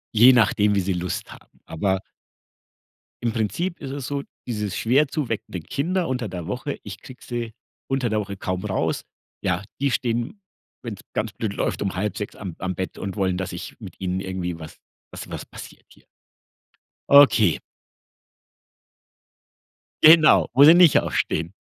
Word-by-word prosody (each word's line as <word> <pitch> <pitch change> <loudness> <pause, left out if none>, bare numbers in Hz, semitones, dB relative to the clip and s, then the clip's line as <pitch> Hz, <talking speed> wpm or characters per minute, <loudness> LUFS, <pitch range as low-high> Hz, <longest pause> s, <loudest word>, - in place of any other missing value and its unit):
Je 120 +4 +8
nachdem, 105 -3 +3
wie - - +3
sie 95 - +1
Lust 90 0 -4
haben. - - -17 0.2
Aber 95 +3 -1 1.2
im 115 - +1
Prinzip 170 - -2
ist 135 -2 -6
es 140 -2 -5
so, 140 -1 -3 0.2
dieses 105 -5 -3
schwer 135 +6 +3
zu 145 -2 -3
weckende 100 -4 -4
Kinder 170 - -1
unter 125 -3 -2
der 90 -3 -6
Woche, 130 +7 -4
ich 100 -1 -8
kriege 130 -1 -13
sie 120 -2 -4 0.4
unter 130 -3 0
der 110 - 0
Woche 100 -2 -5
kaum 95 0 -3
raus, - - -1 0.4
ja, 85 +4 0 0.2
die 140 - +2
stehen, 120 - -2 0.4
wenn's 105 -4 -6
ganz 110 -1 -2
blöd 105 -3 -3
läuft, - - -2
5:30 105 +2 -3
am 95 -6 -7
am 95 0 -3
Bett 95 +2 -5
und 100 0 -5
wollen, 95 -3 0
dass 95 - -4
ich - - -8
mit - - -11
ihnen 95 0 -2
irgendwie 90 -3 -4
was 80 -1 -10 0.3
was - - -8
was - - -6
passiert - - -12
hier. - - -22 1.0
Okay. 130 - +6 2.4
Genau, 155 0 +7
wo 135 +3 +7
sie 155 +3 +10
nicht 175 -3 +7
aufstehen. 80 +3 -2
110 Hz, 160 wpm, -23 LUFS, 95-135 Hz, 2.4 s, sie